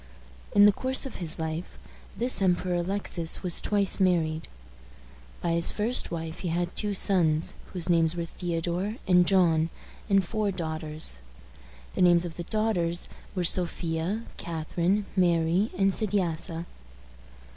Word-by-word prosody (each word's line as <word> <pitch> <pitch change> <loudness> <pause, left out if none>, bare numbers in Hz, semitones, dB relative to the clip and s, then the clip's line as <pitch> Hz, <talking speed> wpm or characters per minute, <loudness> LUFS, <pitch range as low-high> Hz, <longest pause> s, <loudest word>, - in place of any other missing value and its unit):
In 205 0 +7
the 205 - +7
course 260 +5 +2
of 265 - -7
his 165 -3 +1
life, 160 +1 -5 0.4
this 245 -2 +2
Emperor 180 -1 +1
Alexis 175 -2 0
was 180 -2 +3
twice 200 -2 +1
married. 165 -4 +1 0.9
By 170 - -1
his 170 0 +2
first 225 +4 +1
wife 165 -1 -6
he 185 - -4
had 175 +1 -2
two 205 -1 -1
sons, 170 -5 +2 0.2
whose 180 -3 0
names 165 -1 +2
were 170 -1 -3
Theodore 175 +4 -3
and 180 -1 +4
John, 165 -4 +3 0.4
and 195 -2 +3
four 215 +2 -2
daughters. 155 - -1 0.7
The - - -2
names 175 -1 +5
of 165 -2 -7
the 175 - -5
daughters 180 -5 -1 0.3
were 180 - -1
Sophia, 175 +3 +1
Catharine, 170 +4 -2
Mary, 175 +2 +2
and 195 0 +3
Sediassa. 175 -5 -1
175 Hz, 135 wpm, -27 LUFS, 165-195 Hz, 0.9 s, In